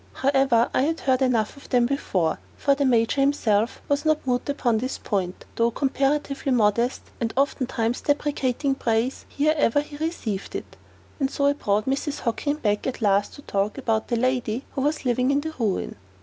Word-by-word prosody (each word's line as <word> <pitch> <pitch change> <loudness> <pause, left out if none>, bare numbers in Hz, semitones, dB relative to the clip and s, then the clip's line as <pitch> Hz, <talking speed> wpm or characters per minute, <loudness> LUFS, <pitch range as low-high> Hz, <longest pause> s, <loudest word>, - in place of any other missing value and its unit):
However, 270 -4 +3
I - - +3
had 320 +4 0
heard 260 -1 +2
enough 235 -5 +1
of 280 - -15
them 245 -2 +3
before; 195 -11 0 0.2
for 280 - +3
the 280 0 0
Major 245 +2 +3
himself 235 -6 +1
was 285 0 +1
not 310 -2 +1
mute 250 +1 -1
upon 245 -6 +1
this 255 +3 -3
point, 185 -3 -3
though 230 0 +3
comparatively 275 +2 0
modest, 235 +1 +2 0.2
and 230 -2 -1
oftentimes 255 -4 0
deprecating 285 -2 0
praise 235 0 -1
ere 305 +2 +4
ever 290 -2 +3
he 295 0 -10
received 290 - -3
it. - - -6 0.4
And 270 -2 +1
so 280 0 -1
I 285 - +4
brought 210 -6 0
Mrs. 280 +2 -2
Hockin 280 +5 -1
back 210 -7 -1
at 250 -3 -4
last 200 0 +2
to 285 - -13
talk 200 0 -1
about 225 -4 0
the 240 - 0
lady 250 0 0
who 270 - -3
was 295 +1 -1
living 250 +1 +2
in 280 +1 +2
the 315 +1 -5
ruin. 210 -5 -1
255 Hz, 185 wpm, -24 LUFS, 225-280 Hz, 0.4 s, ere